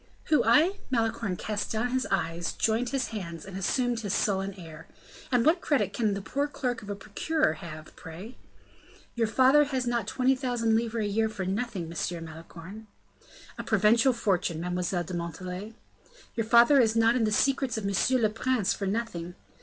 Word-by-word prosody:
"Who, 305 - +4
I?" 340 +7 +4
Malicorne 225 -5 0
cast 210 +2 -3
down 225 +3 0
his 255 +1 -1
eyes, 165 +1 -1
joined 230 +2 0
his 265 -1 -1
hands, 170 -7 -6
and 195 -1 -9
assumed 240 +5 0
his 205 -4 -2
sullen 195 -1 0
air. 160 -4 -11 0.4
"And 245 -2 +3
what 340 +3 +4
credit 290 -3 +1
can 215 -4 0
the 200 - -5
poor 280 +8 -1
clerk 250 -4 -3
of 205 - -10
a 205 - -2
procurer 315 +10 0
have, 155 -4 -10
pray?" 180 +9 -10 0.8
"Your 230 -2 0
father 265 +6 +5
has 260 -3 -2
not 235 -3 -1
twenty 260 +3 +2
thousand 245 -4 0
livres 225 -1 0
a - - 0
year 220 +2 +1
for 195 -3 -5
nothing, 200 0 -2
M. 170 0 -3
Malicorne." 165 +6 -11 0.7
"A - - -3
provincial 220 +4 +4
fortune, 185 -8 0
Mademoiselle 180 0 -1
de 175 - -8
Montalais." 180 +5 -5 0.6
"Your 225 -2 -2
father 240 +5 +6
is 225 -2 +2
not 230 +1 +4
in 235 -3 +2
the 215 - 0
secrets 265 +1 +1
of 215 - -4
monsieur 200 +6 +2
le 220 -3 +2
prince 225 -2 0
for 200 - -4
nothing." 185 -5 -3
220 Hz, 180 wpm, -28 LUFS, 185-245 Hz, 0.8 s, father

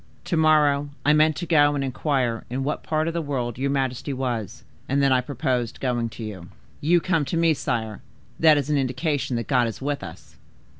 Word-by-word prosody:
To 175 - -1
morrow 150 -3 +3 0.2
I 150 - +5
meant 155 0 +4
to 175 - -4
go 145 -3 +4
and 140 - -1
inquire 130 -3 -1
in 130 +2 -2
what 150 +2 -2
part 155 0 -1
of 165 - -2
the 170 - -1
world 125 -5 -3
your 140 +1 0
majesty 135 0 -1
was, 125 -6 -4 0.3
and 140 +2 +2
then 140 -1 +3
I 130 - +3
purposed 125 -3 -2
going 120 -3 -1
to 115 - -9
you. 95 -5 -7 0.3
You 175 +4 +3
come 165 -3 +1
to 165 - -2
me, 165 -1 +4
sire; 115 -6 -3 0.4
that 155 -2 +6
is 145 +1 -1
an 150 - +2
indication 135 0 -1
that 115 - -2
God 125 -4 +2
is 115 - -6
with 145 +1 -3
us." - - -11
140 Hz, 210 wpm, -24 LUFS, 125-150 Hz, 0.4 s, that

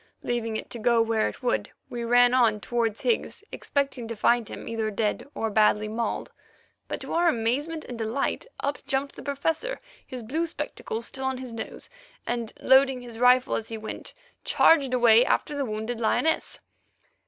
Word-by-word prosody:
Leaving 230 -2 -1
it - - -6
to 235 - -5
go 235 +1 +3
where 225 -1 +2
it - - -12
would, 245 - 0 0.2
we 240 -1 -5
ran 245 +1 +5
on 230 -4 +4
towards 230 0 -1
Higgs, 465 -3 -1
expecting 275 -4 -2
to 230 - -5
find 235 +1 +2
him - - -8
either 225 -1 -1
dead 215 +4 -1
or 225 -1 -1
badly 210 0 +3
mauled, 225 +2 -3 0.6
but, - - -4
to - - -5
our 345 +1 +3
amazement 285 +7 -1
and 245 -2 -7
delight, 230 - -2
up 285 +1 -2
jumped 280 0 -1
the - - -9
Professor, 325 - -2 0.3
his 250 -2 -7
blue 315 +9 -1
spectacles 230 -7 -4
still 265 +2 -4
on 265 -1 -1
his 255 -2 -7
nose, 225 - -6 0.4
and, 235 -2 -2
loading 265 -1 +5
his 235 -2 -9
rifle 250 +1 +5
as 225 - -3
he 225 - -5
went, 220 0 -7 0.3
charged 285 -5 +4
away 235 -1 +6
after 295 - 0
the 280 -1 -1
wounded 220 +1 -4
lioness. 315 +8 0
240 Hz, 175 wpm, -26 LUFS, 225-270 Hz, 0.6 s, away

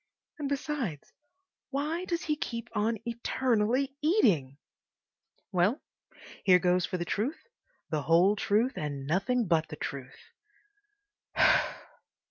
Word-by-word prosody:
And, 285 -2 -2
besides, 270 - -3 0.6
why 300 +6 -2
does 340 -2 -2
he 305 - 0
keep 235 -5 -5
on 220 +2 +1
eternally 240 +2 0
eating? 200 - +2 0.9
Well, 195 - +2 0.6
here 185 -2 +7
goes 180 0 +2
for 185 - -3
the 175 - -3
truth, 245 - -2 0.5
the 155 -2 0
whole 175 +7 +4
truth, 220 +5 +1
and 145 -3 -4
nothing 225 - +1
but 160 -2 +2
the 150 - -7
truth! 135 -3 -6
215 Hz, 110 wpm, -29 LUFS, 170-270 Hz, 0.9 s, here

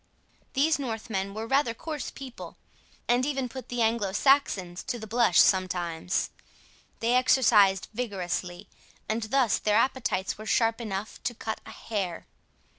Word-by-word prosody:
These 290 +3 +2
Northmen 220 -6 -3
were 220 +1 -4
rather 255 -1 +1
coarse 305 0 -5
people, 265 -3 -9 0.5
and 245 +1 +3
even 270 -2 -1
put 260 +1 -9
the 245 -1 0
Anglo 220 -4 0
Saxons 200 -9 +2
to 240 - -2
the 220 - -7
blush 225 -4 +3
sometimes. 180 -2 +1 0.7
They 230 +1 +2
exercised 220 -7 +4
vigorously, 185 -6 -3 0.4
and 220 +2 -1
thus 235 +1 +2
their 210 -1 +1
appetites 230 -6 0
were 215 - -8
sharp 225 -1 +2
enough 210 -1 -5
to 240 - -1
cut 220 0 -5
a - - -8
hair. 195 -6 -4
225 Hz, 140 wpm, -27 LUFS, 195-250 Hz, 0.7 s, exercised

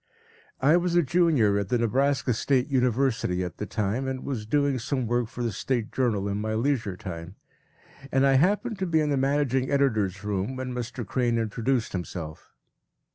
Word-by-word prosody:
I 150 +6 +5
was 175 -1 0
a 175 - +5
Junior 135 - +3
at 100 -2 -3
the 125 - +2
Nebraska 130 +3 +1
State 130 +3 +1
University 125 -7 +1
at 90 -1 -6
the 105 - -4
time, 110 +6 -1
and 130 -1 -3
was 115 -6 -4
doing 140 +1 +1
some 130 +1 -2
work 120 0 0
for 120 +2 -6
the 115 - 0
State 115 +3 -2
Journal 110 -6 0
in 100 +1 -2
my 110 0 -2
leisure 115 -6 0
time, 90 -3 -7 0.8
and 135 +1 +3
I 135 - +4
happened 205 - +2
to 190 - -1
be 160 -2 +2
in 150 -1 +1
the - - +2
managing 135 -1 +1
editor’s 110 -9 +1
room 105 +4 -2
when 130 -1 -4
Mr. 125 0 -5
Crane 120 +1 0
introduced 115 +2 -1
himself. 85 -4 -6
125 Hz, 185 wpm, -26 LUFS, 105-140 Hz, 0.8 s, I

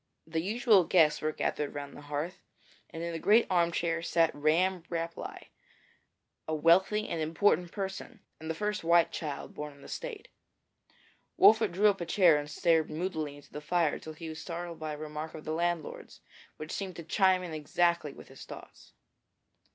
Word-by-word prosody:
The 160 0 -2
usual 210 +1 +4
guests 160 -3 +4
were 155 - 0
gathered 150 -1 -2
round 145 -1 -6
the - - -10
hearth, 150 +5 -4 0.5
and 165 - -7
in 170 0 -3
a 165 - -3
great 215 +7 +5
leather 180 -2 +4
armchair 170 -1 0
sat 165 -1 +2
Ramm 170 +5 +2
Rapelye, 165 -1 -5 1.0
a 155 - -1
wealthy 190 +7 +3
and 165 - -3
important 170 +2 +2
person, 195 +3 -6 0.2
and 160 0 -7
the 160 - -1
first 210 +3 -2
white 170 0 +4
child 150 -3 -5
born 150 -1 -6
in 140 - -18
the - - -11
State. 485 -4 -7 1.1
Wolfert 220 -2 +6
drew 195 +5 0
up 195 -3 +2
a 170 - -4
chair 170 -4 +5
and 145 0 -6
stared 160 0 +2
moodily 155 -3 -3
into 145 - -17
the 150 - -6
fire 165 0 +1
till 160 - -9
he 165 +1 -8
was 160 0 -7
startled 170 -1 -6
by 155 -1 -4
a - - -6
remark 155 +1 -6
of 155 - -9
the 155 - -2
landlord's, 170 -1 -3 0.4
which 155 +1 -7
seemed 190 -3 -4
to 170 - -7
chime 185 +2 +3
in 170 -3 -6
exactly 170 +1 +1
with - - -14
his - - -12
thoughts. - - -12
165 Hz, 185 wpm, -30 LUFS, 155-185 Hz, 1.1 s, Wolfert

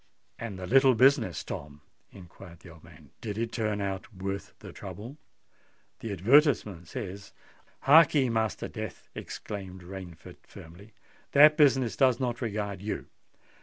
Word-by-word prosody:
"And 110 -4 -6
the 95 - -6
little 130 +4 +5
business, 125 - +3
Tom," 75 0 -8 0.3
inquired 90 -2 -14
the 90 - -13
old 80 -1 -16
man,—"did 85 +6 -10
it 115 0 -2
turn 110 -3 -2
out 95 +2 -4
worth 95 0 -6
the - - -11
trouble? 105 - -9 0.8
The 115 - -5
advertisement 105 - +3
says——" 100 -2 -7 0.5
"Hark'ee, 145 -2 +6
Master 110 -2 -1
Death," - - -8
exclaimed 95 -3 -8
Rainford, 90 -3 -10
firmly; 95 +7 -14 0.4
"that 150 +2 +8
business 135 -6 +3
does 130 -3 +3
not 120 -2 -2
regard 100 -4 -3
you. 105 +1 -4
105 Hz, 130 wpm, -28 LUFS, 95-125 Hz, 0.8 s, that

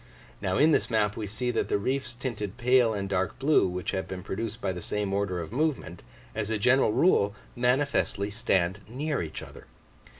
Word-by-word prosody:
Now 95 -2 0
in 155 +2 +5
this - - +2
map 105 -3 +1
we 105 - -4
see 125 +5 -1
that - - -1
the - - +2
reefs 130 +3 -2
tinted 115 -6 -4
pale 125 -1 +4
and 100 -2 -2
dark 95 -3 -1
blue, 140 -1 +4
which 90 0 -3
have 95 - -3
been 90 -1 -6
produced 115 +3 -4
by 95 - -1
the 90 -1 -6
same 100 +2 -2
order 100 -3 0
of 85 +1 -6
movement, 130 - -1 0.3
as 105 -1 -3
a 110 - 0
general 125 +3 +4
rule 110 - +3 0.2
manifestly 125 -5 +1
stand 100 -4 +1
near 145 +5 -2
each 80 -2 -6
other. - - -12
105 Hz, 195 wpm, -28 LUFS, 95-125 Hz, 0.3 s, in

